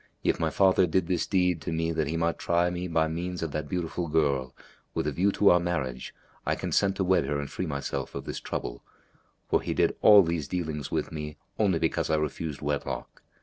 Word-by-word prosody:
If - - +1
my 80 -1 +1
father 95 +3 +4
did 90 +2 +1
this 85 0 0
deed 90 -4 +2
to 75 - -4
me 80 0 0
that 80 -2 0
he 80 +3 -2
might 85 0 0
try 85 +1 +2
me 90 +1 -3
by 80 -2 +2
means 85 +2 -3
of 80 - -3
that 75 0 -4
beautiful 90 -1 -2
girl, 70 -5 +1 0.4
with - - 0
a - - 0
view 100 +3 +2
to 100 - +5
our 90 - +5
marriage, 75 -8 -3 0.3
I - - 0
consent 100 -1 +1
to 95 - 0
wed 95 0 +3
her 75 -1 -1
and 70 - -4
free 95 - -3
myself 70 -2 -4
of - - -5
this - - -4
trouble; - - -5 0.7
for - - +2
he - - -3
did - - +2
all 105 -2 +9
these 85 -4 -2
dealings 80 -5 -3
with - - -2
me 75 -1 -6 0.2
only 100 -5 +3
because 80 - 0
I 80 - +3
refused 75 0 -3
wedlock. 70 0 -3
80 Hz, 220 wpm, -28 LUFS, 75-90 Hz, 0.7 s, all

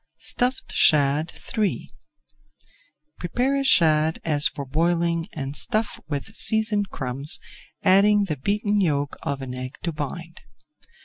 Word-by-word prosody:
STUFFED 250 +2 -1
SHAD 145 +1 +3 0.2
III 215 -3 -1 1.3
Prepare 250 +10 0
a - - -1
shad 160 - +3
as 150 -2 +4
for 140 - -6
boiling 170 +3 0
and 140 -3 -5
stuff 215 +5 -1
with 145 +6 -5
seasoned 215 -2 +1
crumbs, 135 +1 0 0.4
adding 205 +2 +5
the 160 -7 -3
beaten 205 +6 0
yolk 145 -5 0
of 140 -1 -4
an 125 -1 -6
egg 130 +2 -6
to 170 - -1
bind. 165 +3 -7
165 Hz, 125 wpm, -23 LUFS, 145-205 Hz, 1.3 s, adding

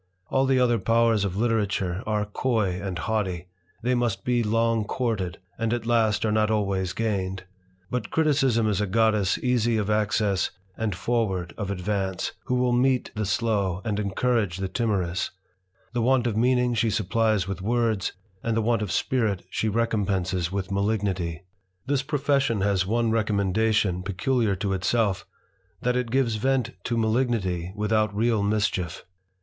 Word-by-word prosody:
All 135 0 +2
the 130 -1 +3
other 120 -2 +3
)wers 115 +1 +3
of 95 -1 -2
literature 105 -5 0
are 105 -1 0
coy 105 -4 -1
and 95 -3 -4
haughty, 90 -2 -2 0.3
they 125 +1 +2
must 120 -6 0
be 125 -1 +2
ng 115 0 +1
courted, 105 -9 -2 0.2
and 115 -1 0
at 115 -2 -5
last 115 -3 +2
are 110 - +1
not 110 0 +2
always 100 -4 0
gained; 95 -4 -2 0.5
but 125 -4 -2
iticism 135 -8 +2
is 105 -1 +1
a 105 - 0
goddess 105 -1 +2
easy 120 -2 +2
of 105 0 0
access 105 -3 +1 0.3
and 110 -4 -2
forward 95 -3 -1
of 100 -2 -4
Ivance, 95 -1 -2
who 125 - 0
will 125 0 +2
meet 125 +1 +2
the 105 -2 -2
slow, 100 -4 0
and 105 -2 -1
encourage 105 -1 0
the 95 -1 -3
aorous; 95 -7 0 0.6
the 120 - 0
want 125 +1 +3
of 115 -3 0
meaning 125 +1 +2
she 115 0 +1
supplies 110 -2 +1
with 95 -2 -4
words, 115 -2 0 0.3
id 115 -1 0
the 115 - +2
want 115 -1 +1
of 105 -5 -2
spirit 110 -6 0
she 110 - 0
recompenses 95 -5 0
with 95 0 -3
malignity. 100 -4 -1 0.4
This 135 0 +1
profession 140 -5 +1
has 95 -2 +1
one 115 +1 +1
recommendation 105 -3 +1
peculiar 100 +3 0
to 100 +2 -2
elf^ 95 +2 0 0.6
that 125 0 +1
it 125 -2 -1
gives 120 -3 +1
vent 130 +2 +1
to 120 - -1
malignity 110 -7 0
without 110 0 +1
real 115 0 +2
mischief. 100 -4 -1
110 Hz, 155 wpm, -25 LUFS, 95-115 Hz, 0.6 s, the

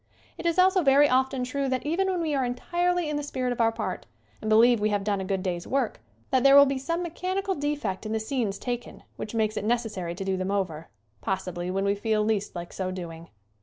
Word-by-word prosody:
It - - -3
is 335 - +1
also 370 0 +5
very 285 -1 +6
often 260 0 +1
true 275 +2 -2
that 260 +1 -1
even 345 +6 +1
when 365 -2 0
we 315 -2 -1
are 270 -2 +1
entirely 345 +8 0
in 300 -1 -1
the - - -1
spirit 260 -3 -2
of 240 - -2
our 225 0 +4
part, 225 - -4 0.3
and 215 - -3
be 215 - +5
lieve 235 +1 +6
we 210 +1 +1
have 205 -1 0
done 200 -1 0
a - - -3
good 190 0 -2
day's 175 -2 -3
work, 275 +1 -1 0.3
that 260 -1 +3
there 275 0 +7
will 280 0 +10
be 275 -1 -1
some 335 +6 -2
mechanical 370 +3 -2
defect 290 - -2
in - - -4
the 220 - 0
scenes 220 -3 -2
taken 245 -1 -5
which 215 - -6
makes 215 -1 0
it - - -2
necessary 215 -7 -1
to 195 - -5
do 190 -1 0
them 185 +1 -2
over, 180 -6 -2 0.3
possibly 180 -2 -3
when 195 +2 -1
we 200 - +3
feel 215 +1 0
least 210 -3 -1
like 175 0 -6
so 185 -1 -3
doing. 170 -3 -7
235 Hz, 240 wpm, -27 LUFS, 195-285 Hz, 0.3 s, will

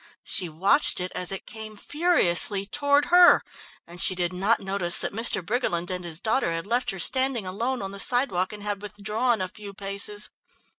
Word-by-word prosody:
She 180 - 0
watched 190 - +1
it 180 0 -5
as 180 0 -1
it 195 - -6
came 220 -2 -10
furiously 205 - +2
toward 285 +5 0
her, 355 0 +6 0.4
and 175 +1 -5
she 185 - +4
did 175 0 -2
not 200 +6 0
notice 190 -3 +3
that - - +2
Mr. 220 -4 +2
Briggerland 185 -6 -3
and 180 -1 -3
his 165 -2 -2
daughter 220 -1 -1
had 165 0 -5
left 240 +4 -1
her 195 - -5
standing 260 +2 0
alone 230 +6 -4
on 195 - -6
the 200 - -7
sidewalk 200 -7 +2
and 210 -1 -10
had 205 -1 -5
withdrawn 210 +3 -3
a 185 - -2
few 200 +1 -12
paces. 200 +1 -3
200 Hz, 190 wpm, -24 LUFS, 185-235 Hz, 0.4 s, her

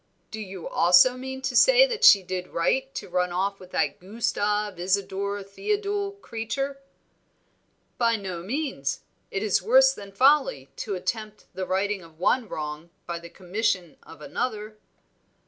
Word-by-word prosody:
"Do 220 - -6
you 190 -4 -7
also 180 +9 +5
mean 265 +1 -7
to 255 - -2
say - - +7
that 480 -3 -4
she 200 -2 +8
did 180 0 -4
right 265 +11 0
to - - -5
run 180 0 0
off 195 +3 -1
with 185 - -13
that 145 -5 -1
Gustave 210 -1 -1
Isadore 200 +2 -1
Theodule 405 - -2
creature?" 270 +4 -4 1.2
"By 230 -1 +3
no 190 -5 -5
means. 215 - -3 0.3
It 195 - -3
is 210 -5 +2
worse 265 +6 +5
than 200 -5 -10
folly 255 - +3
to 205 -3 -3
attempt 215 +2 -4
the 185 -1 -4
righting 195 +1 0
of 165 -2 -16
one 225 +6 +1
wrong 150 +2 -5 0.2
by 170 -1 -4
the 170 0 -11
commission 180 -1 -2
of 160 - -14
another." 215 -6 -4
205 Hz, 150 wpm, -26 LUFS, 180-255 Hz, 1.2 s, she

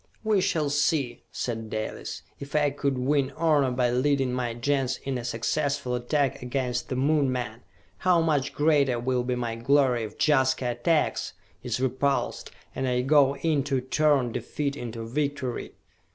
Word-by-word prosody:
"We 215 -3 +2
shall 155 -6 0
see," 145 -4 0
said 115 -2 -4
Dalis, 110 0 -5 0.2
"if 140 +1 -8
I 145 -1 +3
could 140 -1 -1
win 135 +1 +1
honor 150 -5 +3
by 125 -1 +1
leading 135 0 +1
my 120 -2 -2
Gens 135 +1 0
in 135 -2 -2
a - - -6
successful 140 +3 -1
attack 135 +2 0
against 125 -1 -2
the 130 - -2
Moon 140 +1 +2
men, 120 -2 -4 0.4
how 180 -2 +4
much 150 -5 +1
greater 145 -5 +2
will 125 +1 0
be 125 0 -1
my 120 -2 -2
glory 125 0 +3
if 110 - -6
Jaska 130 -4 +2
attacks, 150 +7 0 0.3
is - - -2
repulsed 130 +2 0 0.2
and 130 - -2
I 125 0 +1
go 140 0 +4
in 150 0 +1
to 135 -2 +1
turn 135 -1 +2
defeat 140 +4 -3
into 115 -4 -6
victory!" 135 0 -3
135 Hz, 160 wpm, -26 LUFS, 125-145 Hz, 0.4 s, how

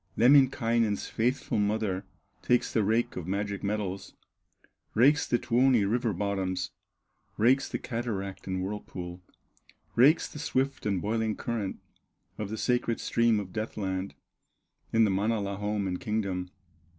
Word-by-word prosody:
Lemminkainen's 120 -4 +4
faithful 120 -1 0
mother 105 -2 0 0.4
Takes 125 - +1
the 110 - +3
rake 110 +4 +1
of 90 -2 -5
magic 100 +1 -2
metals, 100 -2 -3 0.8
Rakes 140 +6 +4
the 120 - +2
Tuoni 120 -2 +3
river 115 +2 +1
bottoms, 95 -2 -2 0.7
Rakes 130 +5 +3
the - - -2
cataract 110 -6 -4
and 95 -1 -2
whirlpool, 90 -3 -6 0.7
Rakes 140 +7 +5
the 150 - -9
swift 135 -4 -1
and 100 -3 0
boiling 110 0 0
current 110 -5 -3 0.6
Of 105 -2 -3
the 110 - -4
sacred 120 -1 0
stream 115 -2 +2
of 95 -3 -7
death 110 0 -4
land, 95 -1 -3 0.8
In 115 0 +4
the 105 - +3
Manala 100 0 0
home 105 -1 -1
and 90 -1 -2
kingdom. 100 -4 -2
105 Hz, 135 wpm, -29 LUFS, 100-120 Hz, 0.8 s, Rakes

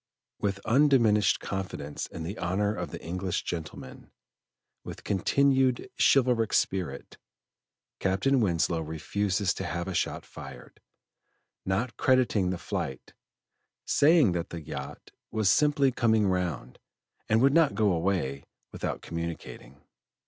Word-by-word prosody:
With 100 -1 -1
undiminished 115 -5 +4
confidence 95 -7 -5
in 80 - -7
the 95 +7 -6
honor 100 +4 0
of - - -5
the - - -7
English 90 +2 -3
gentleman, 80 -3 -7 0.7
with - - -9
continued 130 +5 +2
chivalric 125 -5 +3
spirit 95 -3 -1 0.8
Captain 100 +9 +2
Winslow 85 -4 +1
refuses 90 +5 -1
to - - -5
have 85 +1 -3
a 95 - -3
shot - - -2
fired, - - -12 0.9
not 105 +6 -1
crediting 125 -8 +2
the 90 - -2
flight, 65 -5 -5 0.7
saying 150 - +4
that 85 -1 -3
the 85 -2 -7
yacht - - -8 0.2
was 110 -3 +2
"simply 145 -2 +3
coming 110 -3 +2
round," 90 -10 -2 0.5
and 110 - +4
would 135 +3 +4
not 160 -9 +4
go 105 -1 +3
away 85 -6 -1 0.3
without - - -4
communicating. 85 -4 -7
100 Hz, 120 wpm, -28 LUFS, 85-120 Hz, 0.9 s, undiminished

